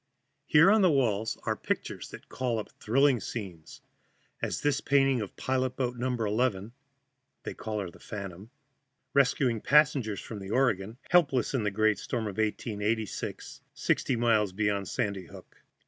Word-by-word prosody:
Here 165 +6 +6
on 215 0 +5
the 185 - +5
walls 110 -7 +1
are - - 0
pictures - - -4
that - - -11
call 125 -3 -2
up 105 - -5
thrilling 135 +3 +3
scenes, 95 -7 -7 0.6
as - - -2
this 145 -1 +1
painting 135 -3 +3
of 105 - -6
pilot 130 -1 -1
boat 125 -2 -1
No. 120 +2 -2
11 110 -2 0 0.7
(they - - -5
call 110 -1 -4
her 90 -3 -6
The - - -17
Phantom), 100 -1 -8 0.6
rescuing 130 -4 +2
passengers 140 -8 +3
from 110 - -7
the 95 -1 -8
Oregon, 110 -3 +1
helpless 140 -10 +3
in 130 - +1
the 105 - +1
great 110 +1 +2
storm 120 -2 -3
of 105 -1 -5
1886, 110 0 -2
sixty 130 - 0
miles 110 -4 +2
beyond 100 -1 0
Sandy 100 -7 -2
Hook. - - -14
115 Hz, 155 wpm, -29 LUFS, 105-130 Hz, 0.7 s, Here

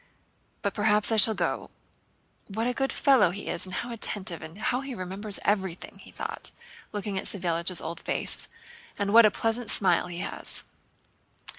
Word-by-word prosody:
But 200 - -1
perhaps 210 +1 +3
I 225 - +2
shall 220 +1 +8
go. - - -2 0.8
What 220 +3 -3
a 250 - 0
good 270 +1 -1
fellow 270 - +4
he 195 +4 -6
is 180 - -2
and 185 - -7
how 240 - -4
attentive, 195 -6 +1
and 160 +3 -10
how 250 +4 -1
he 270 -2 -6
remembers 195 +2 -3
everything," 190 -4 -2
he - - -14
thought, - - -3 0.4
looking 205 -2 -3
at - - -6
Savélich's 175 -2 0
old 170 +1 -6
face, - - -1 0.5
"and 200 0 -1
what 230 -1 +9
a - - +4
pleasant 225 +2 -2
smile 180 -3 +2
he 175 -1 -7
has!" - - -6
205 Hz, 170 wpm, -27 LUFS, 185-225 Hz, 0.8 s, what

